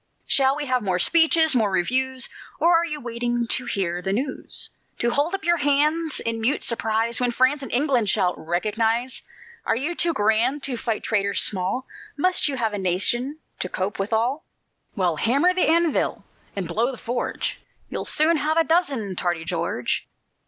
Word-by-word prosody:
Shall 270 0 +3
we 295 0 -3
have 255 -2 0
more 190 -4 0
speeches, 320 - +4
more 225 -5 +2
reviews? 255 +8 +1 0.3
Or 340 +1 +4
are 340 - 0
you 300 -3 -4
waiting 240 -1 -2
to 245 +2 0
hear 180 -5 -1
the 190 +1 -2
news; 260 +7 -2 0.3
To 240 - 0
hold 295 +9 0
up 390 - -7
your 345 +1 +3
hands 300 +2 +2
in 230 0 -2
mute 265 +7 +1
surprise, 225 0 0
When 245 - +2
France 255 +4 +2
and 270 - -7
England 250 -5 +1
shall 180 -2 +2
"recognize"? 220 +9 -1 0.4
Are - - +1
you 285 +9 -2
too 345 0 +1
grand 230 +6 +2
to 265 -2 -2
fight 225 -2 -3
traitors 200 -2 +1
small? 195 +7 -2 0.3
Must 365 +3 +1
you 280 - -2
have 225 -4 -1
a 205 - -3
nation 240 - 0 0.2
to 185 - -3
cope 190 +3 -3
withal? 225 +8 0 0.5
Well, 175 -4 0
hammer 280 - +3
the 365 - +1
anvil 335 -1 +1 0.3
and 190 -4 -3
blow 225 +9 0
the 260 - -6
forge 240 0 -3 0.3
You'll - - -4
soon 315 +2 +4
have 305 +2 0
a 330 - +5
dozen, 280 - 0
tardy 175 -2 -2
George. 165 -8 -2
245 Hz, 175 wpm, -23 LUFS, 205-290 Hz, 0.5 s, a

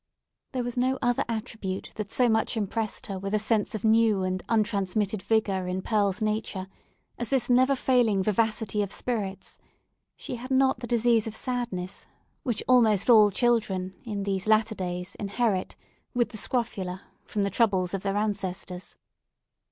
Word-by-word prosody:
There 255 -2 -1
was 245 0 -4
no 260 +2 +2
other 245 0 +2
attribute 220 -4 -4
that 210 -2 -5
so 250 - +4
much 220 +1 +1
impressed 215 +1 -2
her 195 -2 -5
with 195 +2 -2
a - - +4
sense 215 0 0
of 215 - -5
new 220 -3 +4
and 185 0 -1
untransmitted 205 -2 0
vigour 200 -3 0
in 185 +1 -3
Pearl's 205 -2 +1
nature, 215 -3 -2 0.5
as 240 - -2
this 260 -3 +1
never 260 +3 +5
failing 240 -7 +2
vivacity 215 0 +1
of 200 -2 -2
spirits: 205 -6 -3 0.6
she 250 - -6
had 250 +2 -8
not 265 -2 +3
the 240 - -6
disease 235 -2 +2
of 220 - -3
sadness, 235 -8 -3 0.3
which 240 -4 -2
almost 230 -4 +5
all 215 -3 +8
children, 195 -4 +1
in 210 -5 -4
these 195 0 -2
latter 220 +1 +3
days, 180 -2 -4
inherit, 205 -1 -1 0.4
with 240 -1 +2
the 220 - -8
scrofula, 190 -7 -2 0.2
from 205 - -2
the 200 - -1
troubles 190 -6 +2
of 195 - -2
their 195 0 -1
ancestors. 190 -3 -3
215 Hz, 160 wpm, -27 LUFS, 195-235 Hz, 0.6 s, all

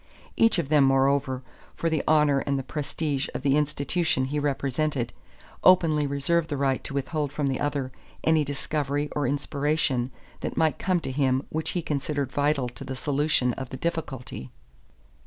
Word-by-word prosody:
Each 225 -3 +4
of 160 -5 -1
them, 150 -2 +5
moreover, 135 -1 +2 0.3
for 165 - -1
the 160 -3 +1
honor 150 -2 +4
and 135 -1 -2
prestige 145 -1 -2
of - - -4
the 140 -1 +3
institution 150 0 +1
he 145 +3 -1
represented, 140 -2 -1 0.5
openly 160 -5 +5
reserved 155 +4 +1
the 145 - -2
right 135 -1 +1
to 140 - -5
withhold 145 +1 -1
from 145 0 -2
the 135 -2 0
other 140 -3 -1 0.3
any 160 -1 +4
discovery 145 0 -2
or 145 -3 +1
inspiration 140 -2 0 0.3
that - - -4
might 160 -1 +2
come 185 -2 +1
to 135 - -4
him 130 -1 +1
which 160 0 -2
he 175 - -1
considered 145 -2 -2
vital 145 -2 +1
to 120 - -9
the 135 - -5
solution 145 -2 +1
of 130 0 -6
the 130 - -6
difficulty. 135 - -4
145 Hz, 165 wpm, -26 LUFS, 135-155 Hz, 0.5 s, them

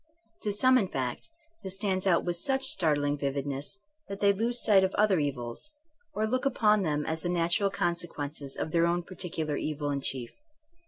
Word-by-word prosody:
To 210 - -1
some, 255 +5 +5
in 200 - 0
fact, 130 - -4 0.3
this 190 -2 -4
stands 195 -1 -1
out 170 -3 +3
with 175 -1 -1
such 265 +8 0
startling 145 -4 +2
vividness 140 +6 -3 0.3
that 200 0 -6
they 200 -1 +4
lose 235 +4 0
sight 195 -3 +6
of 190 - 0
other 205 -4 +3
evils, 135 - -4 0.4
or 215 - +1
look 255 +4 -1
upon 215 -6 +3
them 150 -4 -1
as 160 0 -3
the 175 - -2
natural 175 +3 +1
consequences 160 -6 -3
of 155 - -3
their 170 0 +3
own 175 +1 0
par 185 - -11
ticular 160 -5 -2
evil 150 -1 -2
in 140 -1 -2
chief. 130 -3 -1
175 Hz, 190 wpm, -29 LUFS, 145-200 Hz, 0.4 s, sight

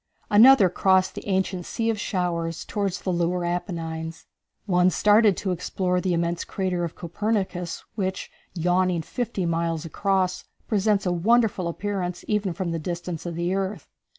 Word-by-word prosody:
Another 225 0 +8
crossed 190 +1 +2
the - - -8
ancient 190 -2 0
Sea 230 +5 -1
of 215 - -4
Showers 170 -5 -2
toward 200 -3 -1
the 185 - -3
lunar 175 0 0
Apennines. 165 -2 -4 0.4
One 180 -2 +4
started 210 +1 +4
to 190 - -2
explore 180 +1 -1
the 180 -2 0
immense 170 0 -1
crater 185 -2 -2
of 170 - -4
Copernicus, 185 -1 -2
which, 190 -3 -3 0.2
yawning 180 0 +1
fifty 230 -2 -3
miles 165 -1 -1
across, 185 +1 0 0.2
presents 205 -1 +1
a 180 - +1
wonderful 210 0 +2
appearance 180 0 -3
even 210 -3 0
from 170 0 -3
the 165 - -2
distance 175 0 -5
of 170 - -4
the 170 +2 -1
earth. 195 +1 -3
180 Hz, 150 wpm, -25 LUFS, 170-200 Hz, 0.4 s, Another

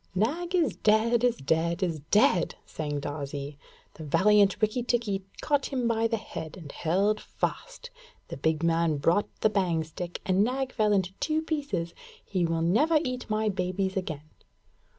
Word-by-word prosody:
'Nag 330 - 0
is 315 - +2
dead 225 +2 +3
is 245 -2 +3
dead 165 +6 0
is 165 -4 -1
dead!' 210 -5 +3
sang 145 -2 -4
Darzee. 145 0 -5 0.3
'The 160 - -10
valiant 200 +6 +4
Rikki 215 +3 +1
tikki 230 -5 -1 0.2
caught 290 -2 +1
him 255 -4 -1
by 230 0 +2
the 225 0 -1
head 160 -7 -7
and 155 -6 -9
held 200 +6 +1
fast. - - -5 0.4
The - - -6
big 160 0 0
man 165 -2 +2
brought 170 +8 +2
the 215 - +4
bang 180 -5 +1
stick, 170 +2 -6
and 190 +1 +3
Nag 260 +3 -1
fell 215 -3 +2
in 195 -2 +3 0.2
two 315 0 0
pieces! 285 - -2 0.3
He 180 -4 0
will 165 0 0
never 290 - +3
eat 250 -3 -4
my 215 0 0
babies 190 -1 -1
again.' 160 -6 -4
195 Hz, 165 wpm, -28 LUFS, 165-235 Hz, 0.4 s, valiant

